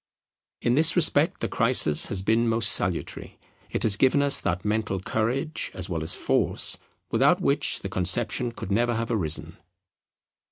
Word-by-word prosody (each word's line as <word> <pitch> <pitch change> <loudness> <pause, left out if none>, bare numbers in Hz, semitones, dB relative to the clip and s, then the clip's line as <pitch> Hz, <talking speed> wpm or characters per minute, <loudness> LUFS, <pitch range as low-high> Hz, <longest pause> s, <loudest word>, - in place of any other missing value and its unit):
In 120 - +1
this 160 +4 +4
respect 165 0 +2
the - - -1
crisis 115 - +2
has 95 -1 -4
been 115 +3 +1
most 115 0 +2
salutary; - - -3 0.3
it - - -2
has 105 -3 +4
given 135 +4 +2
us 140 -1 +3
that 90 +3 -3
mental 105 -2 -2
courage 125 - -3
as 95 0 -4
well 80 -2 -3
as 80 - -1
force - - -1 0.3
without - - +2
which - - +1
the - - -6
conception 95 +6 0
could 105 - -8
never 120 +3 0
have 115 +1 -3
arisen. 85 -9 -1
115 Hz, 160 wpm, -24 LUFS, 95-125 Hz, 0.3 s, this